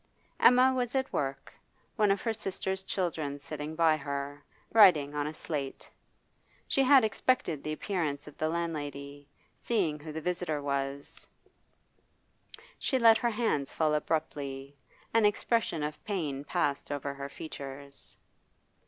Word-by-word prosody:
Emma 255 +1 +6
was 250 -1 -1
at 265 0 0
work, 135 -1 -3 0.4
one 210 -3 +3
of 195 -1 +1
her 225 - 0
sister's 190 -2 -2
children 160 -7 -2
sitting 150 +2 -6
by 160 -1 +4
her, 140 0 -5 0.3
writing 170 -10 +6
on 145 0 -1
a 155 - -4
slate. 140 -4 -4 0.8
She 275 - +2
had 270 -1 +7
expected 215 - +1
the 155 - -3
appearance 155 -5 -2
of 150 - -11
the 155 - +1
landlady; 145 -4 -4 0.3
seeing 175 -10 0
who 155 +1 -8
the 160 - -4
visitor 175 -2 -2
was, 140 0 -3 1.5
she 265 - +1
let 230 -2 +6
her 240 - +1
hands 215 - 0
fall 155 -1 +2
abruptly; 145 -3 -2 0.4
an 225 -1 +4
expression 210 -5 +1
of 150 0 -5
pain 155 -10 -2
passed 140 0 -1
over 140 -1 -3
her 140 0 -6
features. 140 -2 -8
155 Hz, 135 wpm, -30 LUFS, 140-200 Hz, 1.5 s, had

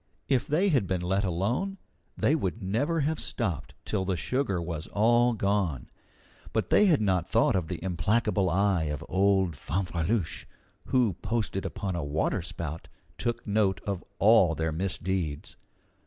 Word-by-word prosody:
If 130 -3 +1
they 175 +7 +2
had 130 - +2
been 90 -1 -1
let 95 +3 +1
alone, 110 - -1 0.4
they 145 - +3
would 100 - -2
never 135 - 0
have 155 +2 0
stopped 95 - -3
till 100 -3 -1
the 95 -1 -1
sugar 125 -7 -1
was 85 -2 -4
all 120 +3 +3
gone. 100 - -1 0.6
But - - -1
they 210 - +6
had 155 - +4
not 95 -5 +1
thought - - +3
of 90 -4 0
the 90 - -3
implacable 100 +2 +1
eye 95 -1 +2
of 75 -2 -4
old 95 -3 +2
Fanfreluche, 85 +4 -2 0.4
who, 125 -6 +2
posted 105 -2 -2
upon 95 -3 -4
a 85 - -2
water 75 +3 0
spout, 80 0 -6 0.3
took 120 0 -2
note 100 -3 +1
of 100 -3 -3
all 100 -6 +5
their 80 0 -1
misdeeds. 90 -2 -3
95 Hz, 155 wpm, -28 LUFS, 85-115 Hz, 0.6 s, they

